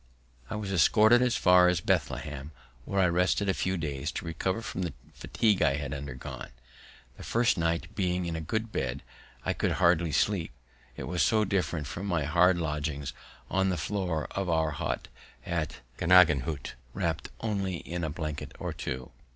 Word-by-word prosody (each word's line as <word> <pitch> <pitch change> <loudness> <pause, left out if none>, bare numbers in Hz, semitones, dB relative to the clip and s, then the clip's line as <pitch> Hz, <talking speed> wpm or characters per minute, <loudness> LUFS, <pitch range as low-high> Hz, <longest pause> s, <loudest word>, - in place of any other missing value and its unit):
I - - -3
was 100 -2 -3
escorted 110 +7 +6
as 125 -2 +2
far 90 -1 +6
as 90 -2 +3
Bethlehem, 75 -3 -1 0.4
where 100 - -1
I 95 - +5
rested 90 +4 +2
a 95 - +3
few 95 0 -1
days 75 -2 -3
to - - -4
recover 95 +7 -2
from 105 -4 -4
the 85 -5 -2 0.2
fatigue 105 -4 +1
I 70 - +4
had 70 -1 -4
undergone. 70 -2 -6 0.7
The - - -9
first 120 +1 +2
night, 85 -1 -1
being 90 -2 0
in 85 -1 -3
a 80 - -3
good 110 +7 -2
bed, 65 -9 -2 0.4
I - - +1
could - - 0
hardly 85 -1 +3
sleep, 95 0 +1 0.4
it - - -5
was 90 0 -1
so 110 -1 +3
different 90 -6 -1
from 90 +8 -5
my 85 -5 +1
hard 85 +4 +4
lodging 75 -3 -2 0.4
on 95 0 +1
the 90 - 0
floor 90 -3 -1
of 95 -2 -2
our 80 -2 +2
hut - - -3 0.4
at 85 -6 -3 0.2
Gnaden 80 -7 +6 0.5
wrapt 85 -4 -2
only 100 -4 -1
in 85 0 -5
a 80 - -1
blanket 75 -1 -5
or - - -4
two. 65 -1 -5
85 Hz, 175 wpm, -29 LUFS, 75-95 Hz, 0.7 s, escorted